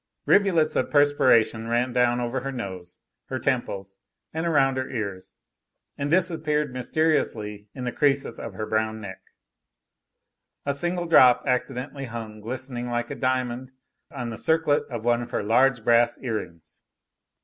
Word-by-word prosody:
Rivulets 175 -6 +3
of - - 0
perspiration 130 -6 +3
ran 120 +2 0
down 125 -1 +2
over 120 +2 -2
her 135 +2 -4
nose, 95 -8 -7 0.3
her - - -3
temples, 95 0 -2 0.3
and 160 +2 -2
around 135 -5 +3
her 130 0 -2
ears, 100 -6 -5 0.6
and 140 0 -3
disappeared 155 -5 +1
mysteriously 120 -7 -1
in 130 - -6
the 125 - -2
creases 140 0 0
of 110 -5 -7
her 110 - -3
brown 110 0 -1
neck. 95 -3 -8 1.4
A 140 - 0
single 175 +4 0
drop 130 -7 +6
accidentally 135 +1 -2
hung 110 -3 -7
glistening 125 +1 -5
like 120 0 -2
a - - -3
diamond 130 0 -2 0.4
on 125 -6 -5
the 110 - -7
circlet 160 -2 +2
of 120 -3 -5
one 120 0 +2
of 120 - -7
her - - -2
large 125 +2 +3
brass 120 0 +4
earrings. 105 -10 -6
125 Hz, 150 wpm, -25 LUFS, 115-140 Hz, 1.4 s, drop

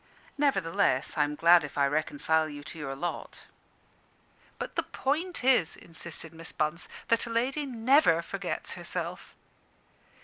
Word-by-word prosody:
Nevertheless, 175 - +1
I 150 - +3
am 150 0 -4
glad 170 +2 +6
if 145 - -7
I 140 - +4
reconcile 155 +2 +1
you 145 -1 -8
to 160 +2 -8
your 135 -2 -4
lot." 175 +6 -5 1.1
"But - - -6
the - - +2
point 320 +4 -2
is," 250 -11 +4
insisted 165 -1 -7
Miss 165 0 -4
Bunce, 155 +3 -1 0.2
"that 230 +1 +3
a - - -6
lady 265 +6 0
never 260 +4 +4
forgets - - -4
herself." - - -6
165 Hz, 140 wpm, -29 LUFS, 150-250 Hz, 1.1 s, glad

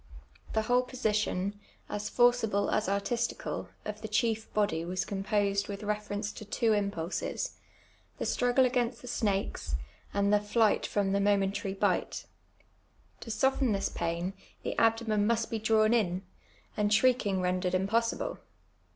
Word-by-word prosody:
The 220 - +2
whole 245 +2 +3
position 210 -5 -1
— - - -34
as 210 - -4
forcible 240 -4 +3
as 215 -1 +1
artL»itical^ 215 +4 -2 0.2
of 210 0 -5
the 220 - -4
chief 220 +1 0
body 200 -6 +1
was 185 +2 -2
composed 200 0 0
with 200 +1 -6
reference 210 0 -2
to - - -9
two 220 +2 +1
impulses 200 -4 -2 0.3
— - - -34
the - - -3
strufrgle 245 +1 +3
against 245 -1 0
the - - -8
snakes, 200 - -1 0.4
and 200 0 +2
the 210 - +6
flight 210 +1 +2
from 200 -2 0
the 200 - +2
momentary* 195 -1 +1
bite. - - 0 0.9
To - - -9
soften 260 +1 +2
this 195 - 0
pain, 170 +2 -2 0.3
the - - -2
abdomen 225 -2 +2
must 230 -1 +1
be 225 - -1
drawn 220 +1 +3
in, 190 -5 +1 0.5
and 210 -1 +1
shriek 250 +1 +4
ing 190 -2 +1
rendered 180 0 0
impossible. 225 +5 0
210 Hz, 150 wpm, -30 LUFS, 200-230 Hz, 0.9 s, the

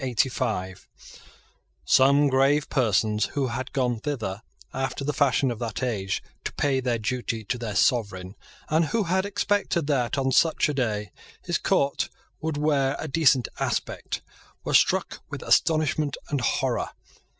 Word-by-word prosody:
Some 140 +2 +5
grave 140 +2 +2
persons 110 -4 +2
who 135 -3 +1
had 130 +3 -4
gone 125 -4 0
thither, 110 -7 -4 0.3
after 135 +1 -3
the 150 +2 -1
fashion 135 -2 +2
of 115 - -6
that 120 +1 -4
age, 100 -6 -2 0.2
to - - -3
pay 140 -2 +1
their 125 -2 0
duty 115 0 -3
to 115 +4 -2
their 110 -4 -4
sovereign, 100 -6 +1 0.3
and 160 +2 +2
who 220 +8 0
had 190 +2 0
expected 205 -4 0
that, 140 -3 0
on 135 -1 +1
such 160 +3 +3
a 150 - -1
day, 105 -7 -2 0.3
his - - -1
court 140 0 +1 0.3
would 160 -2 -3
wear 145 -2 +1
a - - -5
decent 140 -5 +3
aspect, - - -3 0.4
were - - -3
struck - - +2
with - - -6
astonishment 155 -2 +2
and 140 -3 0
horror. 120 - 0
135 Hz, 145 wpm, -25 LUFS, 120-150 Hz, 0.4 s, Some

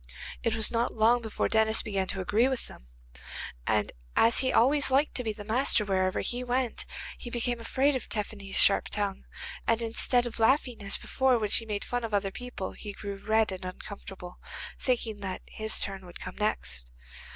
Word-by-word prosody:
It 225 -1 +1
was 220 -1 +1
not 235 +1 0
long 230 +2 +4
before 220 -2 -1
Denis 220 0 +4
began 195 -3 -1
to 190 - -2
agree 215 +7 +3
with 260 -2 -2
them, - - -14 0.8
and 105 -1 +2 0.2
as 230 +1 +5
he 260 0 +2
always 280 +4 +4
liked 275 +3 +3
to 250 - +3
be 220 -2 -2
master 230 -1 +4
wherever 185 -1 +1
he 245 +1 -2
went, 250 -1 -1 0.3
he 240 - -6
became 240 0 -1
afraid 270 +5 +1
of 260 - -4
Tephany's 200 -2 -3
sharp 200 - +5
tongue, 200 -2 -2 0.4
and 230 0 +3
instead 235 +2 +2
of 235 -1 -4
laughing 245 0 +2
as 200 0 0
before 265 -2 +2
when 210 -3 -2
she 225 - +3
made 205 -2 -2
fun 245 -1 -2
of 220 -2 -1
other 195 -1 0
people 245 -4 -6
he 205 -2 -7
grew 200 0 -6
red 220 -1 +2
and 185 0 -6
uncomfortable, 185 -1 -8 0.4
thinking 230 -4 -1
that 190 -2 -4
his 220 0 -1
turn 195 -1 -2
would 175 - -10
come - - -7
next. 65 - -1
220 Hz, 185 wpm, -29 LUFS, 200-245 Hz, 0.8 s, as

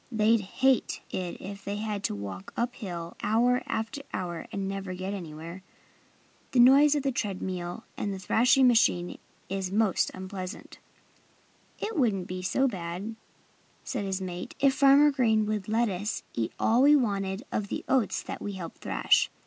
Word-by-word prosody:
"They'd 220 0 +3
hate 260 +6 +1
it 180 -2 -4
if 200 +1 -8
they 200 - -3
had 210 -1 -3
to - - -1
walk 100 -2 -7
up 240 +1 0
hill 175 -7 -6
hour 245 +3 +2
after 225 +5 -3
hour 175 -2 -4
and 195 -1 -3
never 195 -1 -4
get 190 +2 -4
anywhere. 170 -1 -7 0.9
The 255 - +3
noise 280 +4 +7
of 290 - 0
the 275 - +1
tread 205 -7 -2
mill 180 +3 -4
and 205 - -2
the 195 - -4
thrashing 250 +8 +4
machine 180 -7 +2 0.3
is 190 -1 -3
most 210 -1 +2
unpleasant." 185 0 -7 1.0
"It 440 - -4
wouldn't 205 -8 +1
be 185 +1 -5
so 265 +9 +2
bad," 185 +1 -5 0.7
said 245 -6 -3
his 190 0 -2
mate, 180 -1 -6
"if 275 -1 +4
Farmer 280 +2 +6
Green 225 -6 +2
would 210 -2 -2
let 230 +2 +2
us 200 +2 -3
eat 115 -1 -2
all 235 +3 +3
we 290 +2 +7
wanted 200 -5 0
of 205 - -1
the - - -5
oats 260 -5 +1
that - - -6
we 205 - -4
help 175 -4 -7
thrash. - - +2
200 Hz, 170 wpm, -28 LUFS, 185-240 Hz, 1.0 s, noise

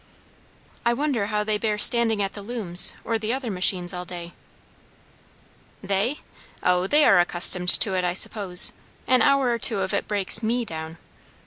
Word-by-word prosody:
"I 235 0 -1
wonder 265 -7 -3
how 210 0 -3
they 210 0 -3
bear 215 -1 -3
standing 225 -1 +5
at 195 - -6
the 205 - -10
looms 200 -5 +1
or 225 -1 -4
the 220 +1 -4
other 255 -3 -5
machines 180 -1 0
all 180 0 -7
day?" 175 -1 -10 1.5
"They? 200 +8 -3 0.4
O, 180 +1 -1
they 295 +6 +2
are 195 - +3
accustomed 180 +1 +2
to 195 - +6
it, 185 -1 -2
I 175 0 -3
suppose. 190 -3 +2 0.3
An 255 -1 +1
hour 275 -2 +1
or 235 - -3
two 225 - +2
of 190 - -3
it - - -4
breaks 205 +1 -1
me 235 +2 -3
down. 160 -3 -9
205 Hz, 175 wpm, -22 LUFS, 180-230 Hz, 1.5 s, to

